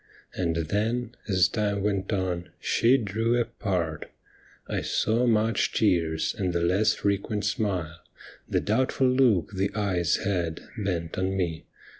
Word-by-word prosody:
And 85 -3 -1
then, 110 +8 -1 0.2
as 95 -4 +4
time 100 -1 -1
went 100 -1 -1
on, 90 -3 -2
she 125 +4 +3
drew 115 +1 0
apart, 90 -9 -2 0.6
1 - - -2
saw 115 +3 +1
much 110 0 +2
tears 85 -6 +1
and 95 -5 -1
the 85 - 0
less 100 +5 +3
frequent 100 +1 -1
smile, 90 -6 -2 0.5
The - - +1
doubtful 130 +4 +1
look 125 - +3
the 95 +1 0
eyes 95 -5 +1
had, 90 -5 -2
bent 90 -6 -3
on 95 +1 0
me. 85 -4 -2
100 Hz, 135 wpm, -26 LUFS, 90-110 Hz, 0.6 s, as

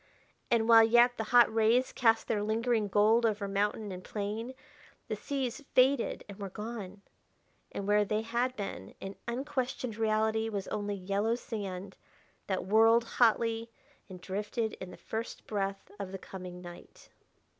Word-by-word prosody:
And, 225 -1 +2
while 230 -1 +9
yet 240 +2 +5
the 220 - -2
hot 240 0 +5
rays 225 +3 +3
cast 225 -2 +3
their 210 -2 0
lingering 220 +1 +1
gold 215 +4 +4
over 210 -3 0
mountain 205 +1 -1
and 185 0 -7
plain, 215 +5 -4 0.5
the - - -1
seas 270 -1 -3
faded 260 0 +3
and 200 0 -10
were 200 -1 -5
gone... 205 -1 -7 0.7
and 200 - -5
where 210 0 +4
they 215 +2 -1
had 240 +3 -1
been 195 - -6
in 195 0 -7
unquestioned 255 -2 -3
reality 220 0 +1
was 200 -3 -4
only 205 -1 -2
yellow 200 +4 0
sand 195 -5 -6 0.5
that 190 -2 -1
whirled 225 +3 +5
hotly 230 -1 +2 0.4
and 185 -1 -10
drifted 210 +4 -3
in 185 - -6
the - - -11
first 225 +1 -6
breath 195 -2 -3
of 195 -2 -5
the 195 - -5
coming 180 -1 -9
night.... 175 0 -12
220 Hz, 155 wpm, -31 LUFS, 200-230 Hz, 0.7 s, while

